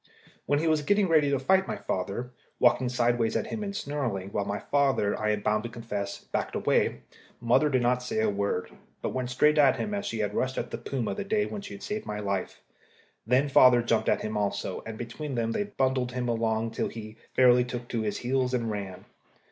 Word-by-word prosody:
When 145 Hz, -, +3 dB
he 155 Hz, -, 0 dB
was 155 Hz, -1 st, +3 dB
getting 205 Hz, +6 st, +2 dB
ready 155 Hz, -4 st, +4 dB
to 140 Hz, -, +2 dB
fight 190 Hz, +8 st, +2 dB
my 215 Hz, -, -2 dB
father 100 Hz, -, -3 dB, 0.3 s
walking 125 Hz, +1 st, +3 dB
sideways 120 Hz, -2 st, +1 dB
at -, -, 0 dB
him 220 Hz, -, -5 dB
and 200 Hz, -1 st, -4 dB
snarling, 135 Hz, -, -3 dB
while 100 Hz, -, -1 dB
my 100 Hz, 0 st, -2 dB
father, 135 Hz, -8 st, +1 dB
I 110 Hz, -, -1 dB
am 105 Hz, -1 st, 0 dB
bound 105 Hz, +1 st, +1 dB
to 120 Hz, -, -6 dB
confess, 105 Hz, -4 st, -4 dB
backed -, -, -3 dB
away -, -, +1 dB, 0.4 s
mother 125 Hz, +6 st, +3 dB
did 130 Hz, -3 st, +1 dB
not 125 Hz, +1 st, +2 dB
say 125 Hz, -3 st, -2 dB
a 110 Hz, -, +2 dB
word, 100 Hz, -2 st, -1 dB, 0.3 s
but -, -, 0 dB
went 125 Hz, -1 st, -2 dB
straight 150 Hz, +4 st, +3 dB
at 140 Hz, -3 st, +6 dB
him 210 Hz, -, -3 dB
as 205 Hz, 0 st, -2 dB
she 115 Hz, -, -3 dB
had 105 Hz, -2 st, -1 dB
rushed 130 Hz, 0 st, -1 dB
at -, -, -3 dB
the -, -, -4 dB
puma 125 Hz, -5 st, -3 dB
that 200 Hz, -1 st, -6 dB
day 210 Hz, -1 st, +2 dB
when 205 Hz, -, -5 dB
she 200 Hz, -, -8 dB
saved 210 Hz, +1 st, -5 dB
my 105 Hz, 0 st, -3 dB
life. 100 Hz, -2 st, -3 dB, 0.7 s
Then 130 Hz, +4 st, +3 dB
father 125 Hz, -3 st, +6 dB
jumped 115 Hz, -1 st, +1 dB
at -, -, +2 dB
him 110 Hz, 0 st, -4 dB
also, 100 Hz, -2 st, -2 dB
and 110 Hz, -1 st, -6 dB
between 130 Hz, +5 st, -5 dB
them 115 Hz, -1 st, 0 dB
they 205 Hz, -, -1 dB
bundled 130 Hz, -8 st, 0 dB
him 125 Hz, -1 st, -2 dB
along 115 Hz, -1 st, 0 dB
till -, -, -1 dB
he 110 Hz, -1 st, -9 dB, 0.2 s
fairly 125 Hz, -1 st, +6 dB
took 120 Hz, -1 st, -6 dB
to 115 Hz, -, -1 dB
his 105 Hz, -1 st, -2 dB
heels 130 Hz, 0 st, 0 dB
and 115 Hz, -2 st, -1 dB
ran. 100 Hz, -3 st, -6 dB
125 Hz, 220 wpm, -28 LUFS, 110-140 Hz, 0.7 s, at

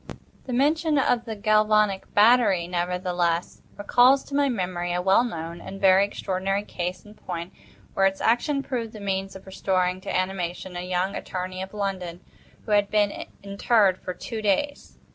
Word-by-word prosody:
The -, -, -4 dB
mention 305 Hz, +4 st, +2 dB
of 245 Hz, -3 st, +1 dB
the 225 Hz, -2 st, -5 dB
galvanic 215 Hz, -1 st, +2 dB
battery, 210 Hz, -5 st, +4 dB
nevertheless, 175 Hz, -1 st, -1 dB, 0.2 s
recalls 245 Hz, +6 st, +4 dB
to -, -, -12 dB
my 285 Hz, -1 st, +3 dB
memory 180 Hz, -6 st, -2 dB
a 175 Hz, -, 0 dB
well 190 Hz, +5 st, +4 dB
known 170 Hz, -7 st, -5 dB
and 195 Hz, 0 st, -8 dB
very 190 Hz, 0 st, +5 dB
extraordinary 195 Hz, 0 st, -2 dB
case 180 Hz, -1 st, -5 dB
in 210 Hz, -, -13 dB
point, 175 Hz, -3 st, -7 dB, 0.4 s
where 195 Hz, 0 st, +3 dB
its 195 Hz, 0 st, -3 dB
action 275 Hz, +5 st, +1 dB
proved 235 Hz, -5 st, -4 dB
the 215 Hz, -, -9 dB
means 195 Hz, -1 st, -3 dB
of 190 Hz, -, -11 dB
restoring 185 Hz, -1 st, -1 dB
to -, -, -8 dB
animation 185 Hz, -1 st, -4 dB
a 175 Hz, -, -3 dB
young 180 Hz, +1 st, -1 dB
attorney 185 Hz, 0 st, -5 dB
of 190 Hz, -, -6 dB
London, 190 Hz, -4 st, -4 dB, 0.4 s
who -, -, -5 dB
had 205 Hz, -1 st, +3 dB
been 205 Hz, -1 st, 0 dB, 0.2 s
interred 200 Hz, -1 st, +2 dB
for 180 Hz, -, -6 dB
two 225 Hz, -3 st, -6 dB
days. 250 Hz, +8 st, -1 dB
195 Hz, 165 wpm, -25 LUFS, 180-215 Hz, 0.4 s, very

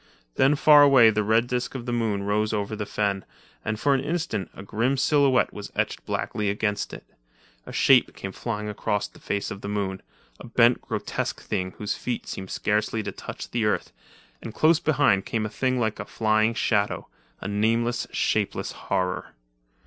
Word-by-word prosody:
Then 135 Hz, -, +4 dB
far 150 Hz, 0 st, +7 dB
away 135 Hz, -6 st, +7 dB
the 105 Hz, 0 st, 0 dB
red 110 Hz, +3 st, +3 dB
disk 125 Hz, +1 st, -3 dB
of 120 Hz, -3 st, -5 dB
the 120 Hz, -, -2 dB
moon 110 Hz, -4 st, 0 dB
rose 105 Hz, +2 st, 0 dB
over 105 Hz, 0 st, -2 dB
the 105 Hz, -1 st, -4 dB
fen, 100 Hz, -2 st, -1 dB, 0.4 s
and 110 Hz, 0 st, -2 dB
for 140 Hz, +3 st, +3 dB
an 135 Hz, -, +2 dB
instant 150 Hz, -, -2 dB
a -, -, -9 dB
grim 120 Hz, +7 st, 0 dB
silhouette 135 Hz, -2 st, +3 dB
was 105 Hz, -1 st, -8 dB
etched -, -, -1 dB
blackly 105 Hz, -1 st, -1 dB
against 105 Hz, 0 st, -1 dB
it. -, -, -9 dB, 0.6 s
A -, -, -7 dB
shape 130 Hz, -3 st, +4 dB
came 95 Hz, -, -6 dB
flying 105 Hz, +1 st, -4 dB
across 105 Hz, 0 st, -1 dB
the -, -, -19 dB
face 100 Hz, 0 st, -3 dB
of 100 Hz, -, -7 dB
the -, -, -6 dB
moon 100 Hz, -2 st, -2 dB, 0.2 s
— -, -, -33 dB
a -, -, -10 dB
bent, 120 Hz, +1 st, +4 dB
grotesque -, -, -3 dB
thing 95 Hz, 0 st, -3 dB
whose 105 Hz, -, -2 dB
feet 125 Hz, -1 st, -4 dB
seemed 95 Hz, -1 st, -6 dB
scarcely 105 Hz, +1 st, 0 dB
to -, -, -4 dB
touch -, -, -8 dB
the 120 Hz, -2 st, 0 dB
earth; 105 Hz, -, -1 dB, 0.5 s
and 110 Hz, -2 st, -8 dB
close 160 Hz, +1 st, +4 dB
behind 140 Hz, -12 st, +2 dB
came 110 Hz, -2 st, -1 dB
a -, -, -3 dB
thing 130 Hz, +3 st, 0 dB
like 110 Hz, -2 st, -1 dB
a -, -, -4 dB
flying 110 Hz, +1 st, +1 dB
shadow—a 105 Hz, -3 st, -2 dB
nameless, 115 Hz, +4 st, 0 dB
shapeless -, -, 0 dB
horror. 90 Hz, -1 st, -3 dB
110 Hz, 185 wpm, -25 LUFS, 105-125 Hz, 0.6 s, far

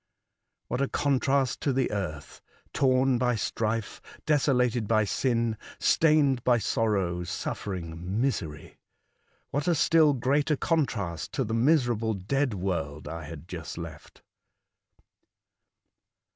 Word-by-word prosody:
What 125 Hz, -, -2 dB
a 140 Hz, -, +2 dB
contrast 135 Hz, -2 st, +1 dB
to 140 Hz, -, +1 dB
the 130 Hz, 0 st, 0 dB
earth 85 Hz, -9 st, -5 dB, 0.2 s
— -, -, -35 dB
torn 130 Hz, -1 st, +3 dB
by 125 Hz, -1 st, +2 dB
strife, 110 Hz, +1 st, -2 dB, 0.2 s
desolated 125 Hz, -6 st, +2 dB
by 110 Hz, 0 st, +3 dB
sin, 115 Hz, +1 st, 0 dB, 0.2 s
stained 145 Hz, -6 st, +3 dB
by 125 Hz, -1 st, +4 dB
sorrow, 100 Hz, -5 st, 0 dB
suffering, 90 Hz, +1 st, -4 dB
misery! 85 Hz, -, -3 dB, 0.7 s
What 145 Hz, +3 st, -1 dB
a 175 Hz, -, +3 dB
still 155 Hz, 0 st, +4 dB
greater 140 Hz, +4 st, +1 dB
contrast 110 Hz, -, -1 dB
to 135 Hz, -, 0 dB
the 110 Hz, -1 st, -4 dB
miserable 120 Hz, -4 st, +2 dB
dead 125 Hz, +6 st, -1 dB
world 85 Hz, -6 st, -3 dB
I 80 Hz, -1 st, -6 dB
had 80 Hz, +1 st, -9 dB
just 85 Hz, -5 st, -7 dB
left -, -, -9 dB
115 Hz, 115 wpm, -27 LUFS, 95-135 Hz, 0.7 s, by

